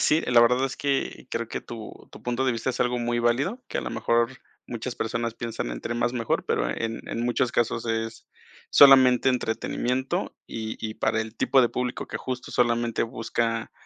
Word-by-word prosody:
sí, 155 +2 +3
la 120 -1 +5
verdad 125 +3 +4
es 135 - -3
que 140 -2 -2
creo 115 0 -3
que - - -4
tu 115 -2 -8 0.2
tu - - -12
punto 125 +2 -1
de 130 - +2
vista 115 +3 -1
es - - -6
algo 125 0 +1
muy 120 0 0
válido, 135 - +1
que - - -3
a - - +1
lo - - -5
mejor 115 0 0 0.3
muchas 120 +1 -4
personas 115 0 -2
piensan 115 - -4
entre 115 - -4
más 120 +1 0
mejor, 115 -3 -1
pero - - +1
en 115 - -3
en 115 +1 -2
muchos 120 0 +1
casos 120 -1 0
es 115 0 -3 0.4
solamente 130 -2 +7
entretenimiento, 125 +1 -1
y 110 -1 -5
y 110 0 -4
para 110 - 0
el 110 0 -6
tipo 135 - +4
de 120 - +4
público 125 0 -3
que - - -5
justo 130 -1 -5
solamente 120 -1 +1
busca 115 -1 -2
120 Hz, 195 wpm, -26 LUFS, 115-125 Hz, 0.4 s, solamente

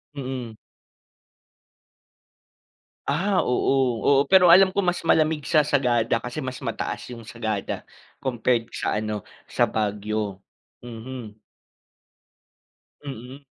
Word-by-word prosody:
Mm. 130 -4 -5 2.5
Ah, 185 +7 +1
oo, 125 -1 +1
oo. 140 - +3 0.2
Pero 185 -2 +7
alam 190 +2 +7
ko 200 - -1
mas 180 -3 0
malamig 155 -2 +2
sa 155 - +3
Sagada 120 -4 +1
kasi 125 0 -5
mas 130 -1 -4
mataas 115 - -3
yung 115 -2 -10
Sagada 110 -4 -3 0.4
compared 120 -2 0
sa - - -2
ano, 105 -1 -3 0.2
sa - - +1
Baguio, 105 -1 -2 0.4
mhm. 120 -2 -8 1.7
Mm, 135 0 -9
125 Hz, 100 wpm, -24 LUFS, 110-145 Hz, 2.5 s, Pero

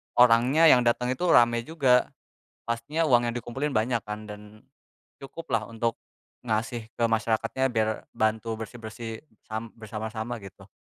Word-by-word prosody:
orangnya 125 +7 +6
yang 125 - +6
dateng 125 +1 +1
itu 155 +8 -2
rame 120 -5 +4
juga, 135 -6 +3 0.6
pastinya 115 +8 -2
uang 120 -4 +3
yang 115 - -3
dikumpulin 135 +4 -3
banyak 115 +2 +1
kan 105 +1 -6
dan 105 0 -8 0.8
cukuplah 135 -6 -3
untuk 115 0 -2 0.5
ngasih 115 +1 -2
ke 115 - +2
masyarakatnya 110 +4 0
biar 110 -1 +1 0.3
bantu 110 0 0
bersih-bersih 110 0 -7 0.2
sam 110 +1 -5
bersama-sama 110 +1 -5
gitu. 95 - -13
115 Hz, 135 wpm, -26 LUFS, 110-125 Hz, 0.8 s, orangnya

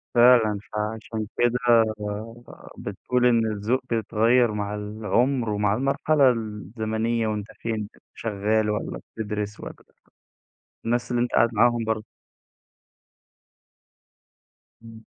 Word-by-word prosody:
فعلًا، 120 -4 +5
فعشان 110 0 -3
كده 120 0 +2 0.4
ب 105 - -6 0.7
ب - - -5
بتقول 125 +5 -1
إن 115 -2 +4
الذوق 110 +5 0
بيتغير 115 +1 +2
مع 105 0 -3
العمر 110 +4 0
ومع 105 -1 +1
المرحلة 135 +3 +3
الزمنية 110 +1 -2
وأنت 105 -1 -3
فين، 110 -2 -3 0.3
شغّال 110 0 0
والّا 105 - -3 0.2
بتدرس 105 -1 -4
والّا - - -8 1.1
الناس 120 +1 -1
اللي 120 -1 +1
أنت 120 - -1
قاعد 115 - +4
معاهم 120 +1 +3
برضو. 110 -1 -2 2.8
إمم. 115 -1 -12
110 Hz, 105 wpm, -25 LUFS, 105-120 Hz, 2.8 s, فعلًا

